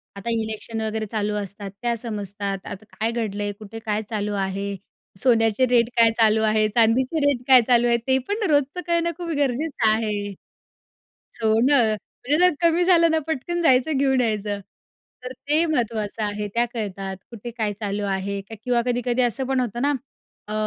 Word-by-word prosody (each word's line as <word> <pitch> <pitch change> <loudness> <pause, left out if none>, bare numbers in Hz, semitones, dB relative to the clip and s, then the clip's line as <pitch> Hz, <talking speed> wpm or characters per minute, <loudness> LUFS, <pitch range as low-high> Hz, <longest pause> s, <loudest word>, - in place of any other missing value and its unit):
आता 200 +3 -5
इलेक्शन 225 0 -2
वगैरे 220 0 -2
चालू 210 0 -2
असतात 200 0 -6
त्या 240 -1 0
समजतात. 205 -3 -4
आता 205 +1 -8
काय 225 +1 -1
घडलंय, 205 -3 -2
कुठे 220 +1 -9
काय 215 -1 -2
चालू 210 -2 -2
आहे, 195 +1 -3 0.5
सोन्याचे 225 -1 +3
रेट 235 -2 +3
काय 230 -1 +6
चालू 220 0 +4
आहे, 215 0 +3
चांदीचे 250 +7 +3
रेट 275 -4 +1
काय 260 -2 +8
चालू 240 -1 +4
आहे 235 0 +3
ते 260 0 +4
पण 415 +2 -2
रोजचं 290 +4 +1
करणं 340 0 +1
खूप 350 -1 -5
गरजेचं 280 -2 0
आहे. 210 -2 -1 1.0
सोनं 230 +2 +3
म्हणजे 275 +7 -3
जर 360 -2 +4
कमी 335 +1 +3
झालं 340 -2 +5
तर 320 - +3
पटकन 325 +3 -2
जायचं 270 0 +3
घेऊन 265 -1 +2
यायचं 210 -3 -1 0.6
तर 255 - -5
ते 295 +5 0
महत्त्वाचं 225 -7 -2
आहे. 205 0 -3
त्या 235 +1 +3
कळतात. 195 -3 -4
कुठे 235 +1 -8
काय 220 -3 -2
चालू 205 0 -2
आहे 200 +1 -3
किंवा 235 +2 -1
कधी-कधी 245 0 0
असं 250 +2 0
पण 265 0 +1
होतं 240 -1 -3
ना 290 +1 +2 0.6
अ, 215 - -4
230 Hz, 170 wpm, -23 LUFS, 210-260 Hz, 1.0 s, काय